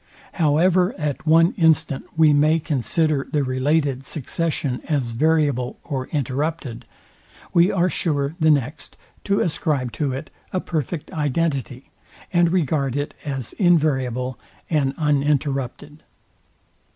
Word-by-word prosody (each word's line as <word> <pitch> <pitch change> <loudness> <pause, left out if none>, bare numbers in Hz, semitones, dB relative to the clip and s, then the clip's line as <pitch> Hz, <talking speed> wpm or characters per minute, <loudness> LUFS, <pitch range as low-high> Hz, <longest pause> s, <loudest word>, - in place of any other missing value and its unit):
However 180 +5 +2
at 150 0 -3
one 165 +5 +5
instant 160 -5 +2
we 155 -2 +6
may 155 +3 +4
consider 150 0 0
the 145 -2 +1
related 135 +1 0
succession 145 -2 -2
as 135 -6 0
variable 145 -2 +1
or 130 -2 -4
interrupted, 140 -2 -3 0.7
we 175 +3 +5
are 180 -1 +2
sure 145 -5 -1
the 155 -1 +4
next 145 0 -1 0.3
to 200 0 +1
ascribe 150 -6 -1
to 145 0 -2
it 130 +1 -6 0.2
a 185 - 0
perfect 160 -2 -4
identity, 145 -3 -2 0.4
and 175 -1 +4
regard 145 -6 0
it 145 0 -2
as 135 -6 -4
enviable 130 - +1 0.3
and 140 -3 +1
uninterrupted. 145 -1 -1
150 Hz, 115 wpm, -22 LUFS, 135-160 Hz, 0.7 s, we